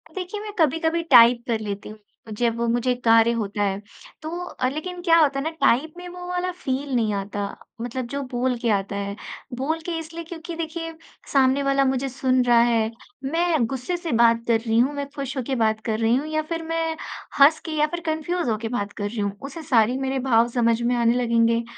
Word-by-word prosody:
देखिए, 375 +3 -4
मैं 425 -1 -6
कभी-कभी 325 +2 +2
टाइप 240 -4 +7
कर 225 -2 0
लेती 205 -1 -5
हूँ, 215 - -10 0.4
जब 230 +1 0
मुझे 245 +1 +1
कार्य 230 +1 +6
होता 205 -2 -2
है। 195 0 -1 0.4
तो 310 - -5 0.2
अ, 255 - -2
लेकिन 350 +5 -5
क्या 335 -2 +5
होता 280 -3 +3
है - - -3
ना 320 - -1
टाइप 305 +6 +3
में 355 0 -8
वो 355 0 -8
वाला 360 0 -1
फील 275 -5 -3
नहीं 220 -3 +1
आता, 200 0 -3 0.3
मतलब 245 +1 -3
जो 280 +2 -4
बोल 250 0 0
के 235 -1 0
आता 200 -1 0
है। 200 0 -3 0.4
बोल 315 +5 -1
के 340 -2 -2
इसलिए 330 +1 -7
क्योंकि 330 0 -8
देखिए, 330 0 -5 0.4
सामने 270 +1 +4
वाला 275 0 +2
मुझे 265 +1 0
सुन 255 0 +1
रहा 240 -1 +5
है, 230 -2 +2 0.3
मैं 325 -2 +1
गुस्से 265 +8 -3
से 340 -2 -5
बात 230 0 +4
कर 230 -1 +3
रही 225 0 0
हूँ, 270 +4 +3
मैं 285 -1 -4
खुश 275 -1 -4
होके 260 +1 -2
बात 220 0 +1
कर 220 -1 -1
रही 230 +2 +3
हूँ 290 +4 -1
या 310 0 0
फिर 330 0 -2
मैं 325 0 -1 0.4
हँस 295 +3 +7
के 320 - -4
या 300 - +4
फिर 345 +2 -4
कन्फ्यूज़ 315 -1 -1
होके 220 +1 -1
बात 205 -4 -3
कर 205 0 -3
रही 225 0 -6
हूँ, 200 -1 0
उसे 285 +4 -7
सारी 245 -2 +3
मेरे 265 0 -1
भाव 230 0 +5
समझ 235 -1 +1
में 245 +1 +1
आने 235 0 +3
लगेंगे, 230 0 +2
260 Hz, 215 wpm, -23 LUFS, 230-320 Hz, 0.4 s, टाइप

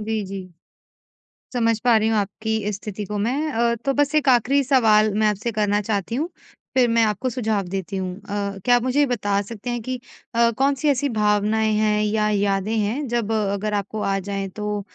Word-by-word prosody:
जी, 215 -1 -2
जी। 190 -1 -7 1.1
समझ 230 -2 +1
पा 240 -2 +5
रही 215 +1 +1
हूँ 220 - +1
आपकी 220 +2 -1
इस 210 - -1
स्थिति 205 0 -6
को 210 +2 -4
मैं 275 +9 -1
अ, 235 -1 +1
तो 270 +4 -2
बस 290 +1 +1
एक 290 -3 +3
आख़िरी 255 +3 +3
सवाल 220 -6 +4
मैं 215 +1 +2
आपसे 210 +3 -1
करना 210 -1 +1
चाहती 210 +2 -2
हूँ, 320 +6 -1 0.5
फिर 250 -2 +5
मैं 230 0 +3
आपको 220 +4 0
सुझाव 220 -4 -1
देती 195 +1 -4
हूँ। 185 -1 -3
अ, 200 -1 -4
क्या 245 - +5
आप 245 - +1
मुझे 255 +3 +1
ये 290 - +5
बता 205 -5 0
सकते 220 +3 -7
हैं 240 -1 -2
कि 255 +2 -4 0.4
अ, 235 0 +4
कौन-सी 275 +2 +1
ऐसी 280 +1 +1
भावनाएँ 210 +1 +2
हैं 210 0 +2
या 210 0 +1
यादें 200 +1 0
हैं 235 +7 -1
जब 230 -2 -1
अगर 210 0 -1
आपको 205 +1 -2
आ 195 0 0
जाएँ 195 -1 -3
तो 210 +1 -3
215 Hz, 205 wpm, -22 LUFS, 205-240 Hz, 1.1 s, पा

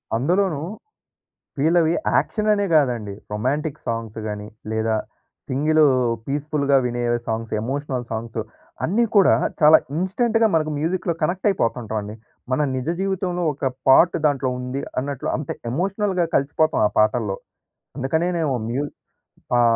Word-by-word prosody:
అందులోనూ 165 - +1 1.0
వీళ్ళవి 165 +2 +3 0.2
యాక్షన్ 215 -1 +1
అనే 205 -1 +1
కాదండి. 120 -9 +1 0.2
రొమాంటిక్ 140 +7 -2
సాంగ్స్ 115 -1 -3
కాని 105 0 -5 0.2
లేదా 110 0 0 0.5
సింగిల్ 155 +4 +2 0.4
పీస్‌ఫుల్‌గా 140 0 +1
వినే 120 0 -2 0.2
సాంగ్స్, 115 0 -3
ఎమోషనల్ 135 0 -3
సాంగ్స్, 115 0 -4 0.4
అన్నీ 225 +8 +2
కూడా 200 -2 +6 0.3
చాలా 155 +1 +8 0.2
ఇన్స్టంట్‌గా 225 +5 +2
మనకు 155 -1 +1
మ్యూజిక్‌లో 170 +3 -1
కనెక్ట్ 180 +6 0
అయిపోతుంటాం 115 - -1
అండి. 105 +1 -7 0.4
మన 130 +4 +2
నిజ 130 +2 -4
జీవితంలో 185 -2 -1
ఒక 140 - -5 0.2
పార్ట్ 165 +6 +6
దాంట్లో 135 -3 0
ఉంది 125 +2 -4 0.2
అన్నట్లు 140 -1 -4
అంటే 150 - -3 0.2
ఎమోషనల్‍గా 190 - 0
కలిసిపోతాం 145 +3 +2
ఆ - - -5
పాటల్లో. 110 -2 +1 0.6
అందుకనేనేమో 160 +1 0
మ్యూ 135 +5 -1 0.7
పా 120 - +5
145 Hz, 120 wpm, -22 LUFS, 120-175 Hz, 1.0 s, చాలా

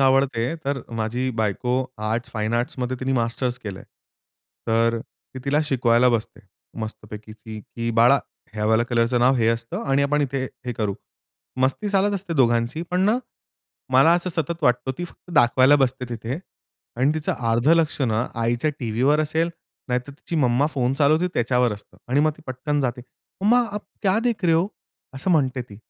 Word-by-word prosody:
आवडते. 135 -1 +2
तर 140 -2 -2 0.2
माझी 120 +4 -1
बायको 110 +4 0 0.4
आर्ट्स, 120 +2 -2
फाईन 110 0 -2
आर्ट्समध्ये 125 +1 -2
तिनी 135 0 0
मास्टर्स 120 +1 -1
केलंय. 100 -3 -7 0.8
तर 115 +1 +2
ती 130 - -14
तिला 145 +2 +2
शिकवायला 125 -3 +3
बसते 115 -3 -1 0.4
मस्तपैकी, 110 0 -8 0.3
की 115 +2 -4
बाळा, 125 +4 +6 0.4
ह्या 105 -1 -2
वाल्या 110 +2 +3
कलरचं 120 0 +1
नाव 130 +2 +5
हे 115 -2 +2
असतं 115 0 -2
आणि 135 +1 +2
आपण 145 +1 +1
इथे 135 -1 -1 0.2
हे 125 - -1
करू. 105 -4 -2 0.7
मस्ती 135 +11 +1
चालत 200 0 +2
असते 185 -3 -4
दोघांची, 120 +2 +2
पण 180 +1 +1
ना 210 +5 +3 0.7
मला 135 +6 +6
असं 175 +1 -1
सतत 165 0 -3
वाटतं, 125 -1 +2
ती 175 - -2
फक्त 175 - -14
दाखवायला 130 +2 +5
बसते 130 0 0
तिथे 120 +3 -4 0.6
आणि 130 +5 +3
तिचं 155 -1 -1 0.2
अर्ध 120 +5 +2
लक्ष 165 -2 +3
ना 115 -1 +1 0.2
आईच्या 120 +6 +1
टीव्हीवर 125 +5 +2
असेल, 160 +2 0 0.4
नाहीतर 125 +2 -1
तिची 160 +4 -6
मम्मा 130 0 +3
फोन 125 -2 +1
चालवते 155 +5 +3
त्याच्यावर 120 -1 +2
असतं 105 0 -11
आणि 135 +4 +3
मग 155 +1 +3
ती 160 - -17
पटकन 135 +3 -2
जाते. 125 -2 -1 0.4
मम्मा, 230 +5 +4
"आप 210 - -3 0.2
क्या 195 +1 +3
देख 230 -5 0
रहे 165 -2 +4
हो?" 170 +3 +3 0.5
असं 135 +8 -2
म्हणते 135 -6 +2
ती. 105 -4 -13
130 Hz, 170 wpm, -23 LUFS, 115-150 Hz, 0.8 s, बाळा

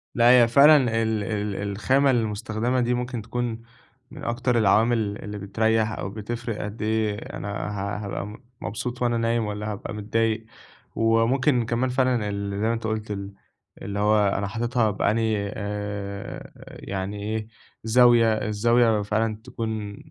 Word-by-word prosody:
لأ، 120 0 +5
هي 120 -1 +7
فعلًا 140 +6 +7 0.3
ال 110 -2 0
ال 105 -1 -2 0.2
الخامة 135 +7 +2
المستخدَمة 110 +1 -1
دي، 120 0 +1
ممكن 125 -1 -3
تكون 115 +1 -3 0.5
من 145 0 -10
أكتر 120 +1 0
العوامل 110 0 +2
اللي 105 0 -6
بتريح 110 +2 +1
أو 95 - -4
بتفرِّق، 115 +2 -5
قد 105 +2 -6
إيه 110 -1 0 0.2
أنا - - -6 0.2
ه 100 0 -3
هابقى 100 - -4
م 105 +5 -11 0.2
مبسوط 125 +3 -4
وأنا 120 -1 +2
نايم 115 0 +1
والّا 105 +1 -4
هابقى 105 +2 -6
متضايق. 110 +1 -1 0.5
وممكن 115 +3 +2
كمان 120 +3 0
فعلًا، 125 -4 +1
ال 100 0 -3
زي 110 - +1
ما 115 - +2
أنت 115 - -4
قُلت، 110 -1 -3
ال 100 -1 -5 0.5
اللي 100 0 -4
هو 105 0 +3
أنا 100 0 -1
حاططها 115 +1 0
بأنهي، 105 0 0
آآ، 100 -1 -5 0.4
يعني 100 +1 -4
إيه، 110 +1 -3 0.4
زاوية 120 +1 +5 0.2
الزاوية 115 +1 +3
فعلًا 110 +1 -1
تكون 110 -4 -5
110 Hz, 150 wpm, -25 LUFS, 105-120 Hz, 0.5 s, هي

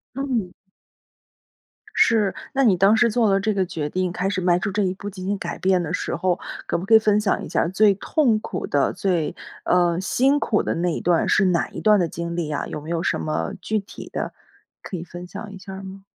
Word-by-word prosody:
嗯。 250 -9 -2 1.4
是， 215 -4 +3 0.2
那 275 -1 +2
你 205 -6 +5
当 195 +5 +5
时 235 0 +4
做 220 -2 +2
了 195 - +3
这 210 +1 0
个 190 - +1
决 150 -3 -3
定， 180 +2 -1
开 180 +2 -1
始 195 -1 -1
迈 175 -1 +3
出 200 +2 -2
这 205 +1 0
一 185 -1 0
步 205 +1 -7
进 185 -1 -8
行 200 +1 -1
改 - - -5
变 185 -1 +2
的 165 +1 -4
时 - - -2
候， 185 -1 0 0.3
可 - - 0
不 185 - -6
可 225 - +5
以 - - +10
分 210 -1 +2
享 210 - 0
一 - - -7
下 - - 0
儿 170 - 0
最 200 +1 +4
痛 240 - +1
苦 - - -4
的， 140 -1 +1
最 175 -5 -1 0.3
呃， 175 -1 +2
辛 265 +9 +2
苦 215 -6 +1
的 - - -1
那 170 0 0
一 - - -4
段 170 -1 +2
是 195 -2 +4
哪 175 -2 +1
一 - - -8
段 210 -1 +5
的 170 -2 +1
经 170 +1 -5
历 165 -3 -2
啊， 150 - -2
有 150 - -5
没 155 - -9
有 170 -1 -1
什 - - 0
么 155 - -2
具 215 +4 -1
体 200 0 -9
的 - - -3 0.5
可 185 - -5
以 170 - -6
分 175 +1 -9
享 205 +3 -8
一 195 - -9
下 195 +1 -10
儿 195 - -8
吗？ 195 0 -9
190 Hz, 265 characters per minute, -23 LUFS, 175-210 Hz, 1.4 s, 以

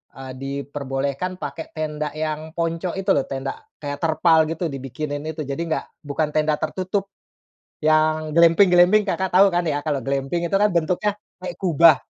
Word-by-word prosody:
eee, 135 -1 -8
diperbolehkan 140 +4 -3
pakai 150 +2 -6
tenda 150 -1 -3
yang 155 0 -4
ponco 165 +1 -2
itu 195 +1 -3
lho, 140 - +2
tenda 135 0 -5 0.2
kayak 145 -1 -4
terpal 160 0 +4
gitu, 165 +1 -2
dibikinin 145 +2 -5
itu, 160 0 -4
jadi 140 0 -4
nggak 165 -1 -2 0.2
bukan 150 +2 -1
tenda 155 0 +2
tertutup. 195 +1 -2 0.7
Yang 155 0 +2
glamping-glamping 180 +4 +6
Kakak 190 -1 -1
tahu, 195 +2 +7
kan 175 0 +1
ya? 145 -1 0
Kalau 145 -4 -1
glamping 140 +5 -1
itu - - -9
kan 205 +2 +4
bentuknya 175 +5 +1 0.3
kayak 180 -1 -5
kubah. 165 -4 +6
155 Hz, 160 wpm, -22 LUFS, 145-175 Hz, 0.7 s, tahu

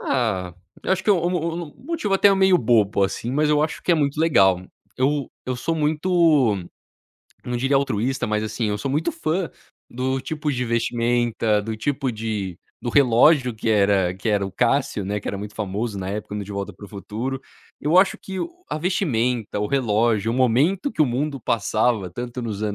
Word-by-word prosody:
ah, 100 -9 0 0.3
eu - - +1
acho 190 - -1
que, 210 - +3
o 175 -3 +3
mo 180 - 0
o 165 +1 -2
mo 170 -4 -7
motivo 310 -13 0
até 200 0 +5
meio 190 -1 +5
bobo 110 - +2
assim, 115 +5 -3
mas 150 +2 +1
eu 150 0 +3
acho 155 - -3
que 175 - +2
é - - +5
muito 145 -2 0
legal. 95 - +4 0.3
Eu 140 +1 0
eu 130 -1 -2
sou 165 +7 -2
muito, 155 - +3 0.9
não 125 0 -2
diria 135 +3 +1
altruísta 130 -1 0
mas 105 0 0
assim, 110 +1 -2
eu 105 0 -1
sou 135 - -3
muito 150 +4 0
fã 170 +3 -2 0.4
do 130 +2 -1
tipo 150 +1 -3
de 125 -1 -1
vestimenta, 115 -2 +1
do 110 +1 -4
tipo 135 +2 -1
de 105 -5 -4 0.3
do 120 - -2
relógio 125 0 +4
que 110 +1 -2
era 100 -3 +3
que 100 +4 -4
era 105 -2 +2
o 95 - -8
Cássio, 125 -4 +1
né, 105 +2 -2
que - - -13
era 100 - -3
muito 105 +1 -7
famoso 105 +1 -3
na 95 0 -4
época 105 0 -5
no 105 - -3
De 100 - -8
volta 100 0 -4
para 105 - -12
o - - -16
futuro. 115 +6 -5 0.4
Eu 160 +5 +3
acho 190 0 +3
que 190 -1 -7
o - - -2 0.2
a - - -2
vestimenta, 125 - 0
o 105 - 0
relógio, 115 -3 +1
o - - -2
momento 140 - +2
que - - -5
o 150 - +3
mundo 135 +2 -2
passava 110 -2 0
tanto 120 +4 -5
nos 105 -4 -4
120 Hz, 205 wpm, -23 LUFS, 105-150 Hz, 0.9 s, até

